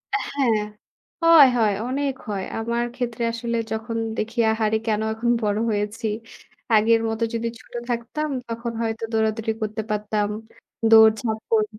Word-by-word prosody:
এ -, -, +3 dB, 0.2 s
হ্যাঁ, 260 Hz, -5 st, +2 dB, 0.7 s
হয় 330 Hz, -5 st, +9 dB
হয় 215 Hz, -3 st, +3 dB
অনেক 275 Hz, +1 st, -1 dB, 0.2 s
হয়। 195 Hz, -2 st, -2 dB, 0.2 s
আমার 235 Hz, +1 st, -1 dB
ক্ষেত্রে 240 Hz, -2 st, -3 dB
আসলে 235 Hz, 0 st, -2 dB
যখন 225 Hz, +1 st, -3 dB, 0.2 s
দেখি 225 Hz, +2 st, -3 dB
আহারে 220 Hz, 0 st, +1 dB
কেন 215 Hz, 0 st, +1 dB
এখন 235 Hz, +2 st, -2 dB
বড় 210 Hz, 0 st, +1 dB
হয়েছি। 210 Hz, +2 st, -2 dB, 0.7 s
আগের 225 Hz, +1 st, +5 dB
মতো 225 Hz, +1 st, -2 dB
যদি 230 Hz, 0 st, -1 dB
ছোট -, -, -19 dB, 0.2 s
থাকতাম 245 Hz, +6 st, -2 dB, 0.2 s
তখন 230 Hz, +1 st, -4 dB
হয়তো 225 Hz, 0 st, -2 dB
দৌড়াদৌড়ি 220 Hz, 0 st, 0 dB
করতে 215 Hz, +1 st, -2 dB
পারতাম। 210 Hz, 0 st, -1 dB, 0.6 s
দৌড়ঝাঁপ 220 Hz, 0 st, +6 dB
কর 215 Hz, -1 st, +4 dB
225 Hz, 145 wpm, -23 LUFS, 215-235 Hz, 0.7 s, হয়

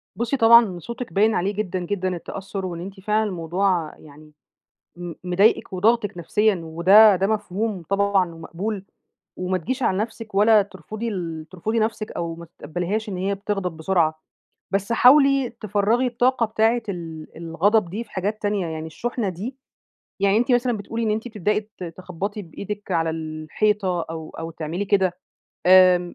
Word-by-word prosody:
بُصي 235 Hz, +4 st, -1 dB
طبعًا 225 Hz, -5 st, +6 dB
صوتِك 235 Hz, +6 st, -7 dB
باين 215 Hz, +2 st, +3 dB
عليه 195 Hz, +3 st, 0 dB
جدًا، 195 Hz, -3 st, -2 dB
جدًا 185 Hz, +1 st, -2 dB
التّأثُّر، 195 Hz, +2 st, -6 dB
وإن 170 Hz, -2 st, -5 dB
أنتِ 190 Hz, +2 st, -8 dB
فعلًا 215 Hz, +2 st, +1 dB
الموضوع 175 Hz, -1 st, -1 dB
يعني 150 Hz, +1 st, -16 dB, 0.6 s
م 175 Hz, -1 st, -6 dB
مضايقِك 190 Hz, +3 st, +2 dB
وضاغطِك 205 Hz, 0 st, +1 dB
نفسيًا، 195 Hz, +2 st, +1 dB
وده 190 Hz, +6 st, +6 dB
ده 190 Hz, +2 st, +1 dB
مفهوم 210 Hz, -2 st, -2 dB
طبعًا 195 Hz, -3 st, +2 dB
ومقبول، 195 Hz, +5 st, -5 dB, 0.5 s
وما 185 Hz, 0 st, -1 dB
تجيش 255 Hz, +9 st, -3 dB
على 185 Hz, -, +2 dB
نفسِك، 220 Hz, -1 st, -5 dB
ولا 210 Hz, +1 st, +6 dB
ترفُضي 205 Hz, +4 st, -7 dB
ال 165 Hz, -7 st, -4 dB
ترفُضي 215 Hz, +5 st, -2 dB
نفسِك، 220 Hz, -1 st, -2 dB
أو 170 Hz, -1 st, -4 dB
ما 170 Hz, 0 st, -10 dB
تتقبليهاش 180 Hz, +6 st, -4 dB
إن 185 Hz, -, -4 dB
هي 195 Hz, +2 st, -1 dB
بتغضب 195 Hz, -4 st, -3 dB
بسرعة، 160 Hz, -2 st, +1 dB, 0.5 s
بس 200 Hz, +3 st, 0 dB
حاولي 275 Hz, +1 st, +5 dB
تفرَّغي 215 Hz, +2 st, 0 dB
الطاقة 245 Hz, 0 st, +2 dB
بتاعة 225 Hz, +2 st, +1 dB
ال 165 Hz, -4 st, -6 dB
الغضب 175 Hz, +4 st, +1 dB
دي 210 Hz, +6 st, -4 dB
في -, -, -25 dB
حاجات 205 Hz, +3 st, -3 dB
تانية، 205 Hz, -4 st, -1 dB
يعني 160 Hz, 0 st, -5 dB
الشُّحنة 230 Hz, +5 st, -3 dB
دي 210 Hz, +9 st, -6 dB, 0.6 s
يعني 200 Hz, +1 st, +3 dB
أنتِ 245 Hz, +2 st, +1 dB
مثلًا 245 Hz, -1 st, +2 dB
بتقولي 225 Hz, +3 st, -4 dB
إن 215 Hz, -, +1 dB
أنتِ 220 Hz, +3 st, -2 dB
بتبدئي 210 Hz, -1 st, 0 dB, 0.2 s
ت 180 Hz, -, -5 dB
تخبطي 185 Hz, +4 st, -5 dB
بإيدِك 200 Hz, +4 st, -7 dB
على 165 Hz, -1 st, +1 dB
الحيطة، 170 Hz, +4 st, -1 dB
أو 160 Hz, -1 st, -6 dB
أو 165 Hz, 0 st, -5 dB
تعملي 165 Hz, +4 st, -4 dB
كده، 190 Hz, -3 st, +1 dB, 0.5 s
آمم 180 Hz, -1 st, +6 dB
195 Hz, 160 wpm, -23 LUFS, 175-220 Hz, 0.6 s, طبعًا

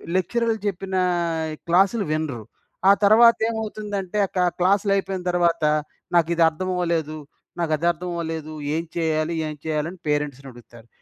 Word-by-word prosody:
లెక్చరర్‌లు 225 Hz, +5 st, 0 dB
చెప్పినా 190 Hz, -1 st, -2 dB, 0.7 s
క్లాస్‌లు 195 Hz, +5 st, +3 dB
వినరు. 155 Hz, -7 st, -2 dB, 0.5 s
ఆ -, -, +10 dB
తర్వాత 230 Hz, +3 st, +7 dB
ఏమవుతుందంటే, 210 Hz, -3 st, -4 dB
ఆ -, -, -31 dB
కా 180 Hz, -, +3 dB, 0.2 s
క్లాస్‌లు 195 Hz, +3 st, +2 dB
అయిపోయిన 195 Hz, -1 st, -2 dB
తర్వాత, 170 Hz, -1 st, +1 dB, 0.5 s
"నాకు 170 Hz, -1 st, +4 dB
ఇది 170 Hz, -, +4 dB
అర్థం 185 Hz, +4 st, -5 dB
అవ్వలేదు, 165 Hz, -3 st, -1 dB, 0.4 s
నాకు 165 Hz, -2 st, -1 dB
అది 170 Hz, +3 st, -1 dB
అర్థం 175 Hz, +2 st, -7 dB
అవ్వలేదు. 160 Hz, -2 st, -4 dB, 0.2 s
ఏం 165 Hz, -, -1 dB
చేయాలి, 160 Hz, 0 st, 0 dB
ఏం 155 Hz, -, -5 dB
చేయాలి?" 155 Hz, 0 st, -1 dB
అని 185 Hz, -, -13 dB
పేరెంట్స్‌ని 145 Hz, -2 st, -2 dB
అడుగుతారు. 120 Hz, -1 st, -16 dB
170 Hz, 145 wpm, -23 LUFS, 155-195 Hz, 0.7 s, ఆ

